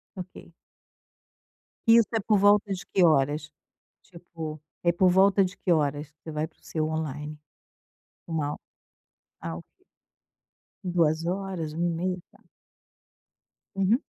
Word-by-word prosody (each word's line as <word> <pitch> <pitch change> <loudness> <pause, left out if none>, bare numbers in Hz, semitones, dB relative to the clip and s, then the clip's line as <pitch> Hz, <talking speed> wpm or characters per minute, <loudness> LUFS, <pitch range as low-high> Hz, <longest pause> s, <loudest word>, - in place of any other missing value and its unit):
Ok. 185 -2 -9 1.4
Isso 230 -2 +7
é - - +3
por 210 0 +2
volta 205 0 +4
de 185 - -5
que 185 - +2
horas? 150 0 +2 0.5
Tipo, 165 -4 -8 0.2
é 170 - +4
por 180 +2 +4
volta 195 +1 +5
de 185 - -6
que 180 - -1
horas 150 -2 +1
você 160 - -8
vai 155 +1 -2
para 160 - -31
o - - -32
seu 155 -1 -2
on-line? 150 -1 -4 0.9
Uma 155 -3 -1
ho - - -8 0.8
ah, 80 -1 -4
ok, 85 - -16 1.0
14:00, 170 0 0
13:30? 175 +2 -1
Tá. - - -23 1.3
Uhum. 195 +5 +3
170 Hz, 125 wpm, -27 LUFS, 155-190 Hz, 1.4 s, Isso